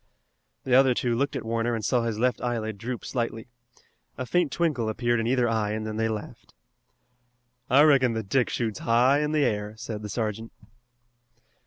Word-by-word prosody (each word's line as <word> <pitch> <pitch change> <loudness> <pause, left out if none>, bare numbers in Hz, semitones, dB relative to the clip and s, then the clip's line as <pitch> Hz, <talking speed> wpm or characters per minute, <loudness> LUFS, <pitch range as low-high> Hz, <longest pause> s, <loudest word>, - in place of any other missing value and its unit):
The 130 - -1
other 130 -1 +5
two 120 -1 0
looked 140 +3 -1
at 130 - -4
Warner 115 +1 -1
and 110 - -4
saw 125 -2 +2
his 115 -2 -2
left 125 0 0
eyelid 110 -4 -3
droop 120 +2 -5
slightly. 115 -3 -3 0.7
A 130 - -3
faint 175 +1 +1
twinkle 145 -10 0
appeared 120 +1 0
in 115 - -1
either 125 -1 +2
eye 110 -2 0
and 110 0 -3
then 110 0 -4
they 115 0 0
laughed. 105 - -7 1.1
"I 140 +4 +6
reckon 135 -5 +4
that 110 -3 -4
Dick 125 +4 +1
shoots 110 -4 -2
high 125 +4 +3
in 150 0 -1
the 150 -2 +2
air," 105 0 -2
said 110 -1 -6
the 105 - -6
sergeant. 110 +1 -3
115 Hz, 185 wpm, -26 LUFS, 110-130 Hz, 1.1 s, I